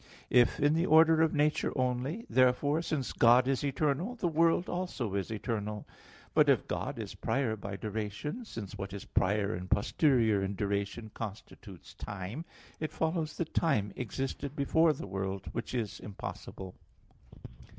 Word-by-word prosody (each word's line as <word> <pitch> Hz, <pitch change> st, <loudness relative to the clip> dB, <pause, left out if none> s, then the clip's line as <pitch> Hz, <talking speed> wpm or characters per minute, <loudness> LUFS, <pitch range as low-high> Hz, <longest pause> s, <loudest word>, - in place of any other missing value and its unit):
If 120 Hz, -1 st, +4 dB
in 145 Hz, +1 st, +4 dB
the 165 Hz, +3 st, +1 dB
order 160 Hz, +1 st, +6 dB
of 160 Hz, -1 st, +4 dB
nature 150 Hz, +1 st, +2 dB
only, 130 Hz, -, -1 dB
therefore, 130 Hz, +4 st, +3 dB
since 150 Hz, -6 st, -2 dB
God 125 Hz, +2 st, +5 dB
is 135 Hz, -1 st, +1 dB
eternal, 150 Hz, -, 0 dB
the 205 Hz, -7 st, -1 dB
world 165 Hz, +2 st, +3 dB
also 175 Hz, -, -3 dB
is 100 Hz, -2 st, -2 dB
eternal. 105 Hz, -1 st, -3 dB, 0.5 s
But -, -, +5 dB
if -, -, +3 dB
God -, -, -3 dB
is -, -, -5 dB
prior 130 Hz, -5 st, 0 dB
by 100 Hz, -1 st, -6 dB
duration; 110 Hz, -, -4 dB
since 105 Hz, -, -7 dB
what 95 Hz, -1 st, -6 dB
is 100 Hz, -, -6 dB
prior 100 Hz, +2 st, +1 dB
and 90 Hz, +1 st, -6 dB
posterior 115 Hz, -3 st, +3 dB
in 95 Hz, +1 st, -2 dB
duration 100 Hz, +2 st, -2 dB
constitutes 100 Hz, -3 st, -9 dB
time, 100 Hz, -, -6 dB, 0.3 s
it 155 Hz, -, -3 dB
follows 160 Hz, -1 st, -1 dB
that 165 Hz, -2 st, -3 dB
time 105 Hz, -12 st, +1 dB
existed 135 Hz, +4 st, -4 dB
before 160 Hz, +3 st, +3 dB
the 145 Hz, -, -5 dB
world, 95 Hz, -1 st, -4 dB
which 115 Hz, +2 st, -4 dB
is 110 Hz, -4 st, -2 dB
impossible. 95 Hz, -2 st, -7 dB
125 Hz, 150 wpm, -31 LUFS, 100-155 Hz, 0.5 s, order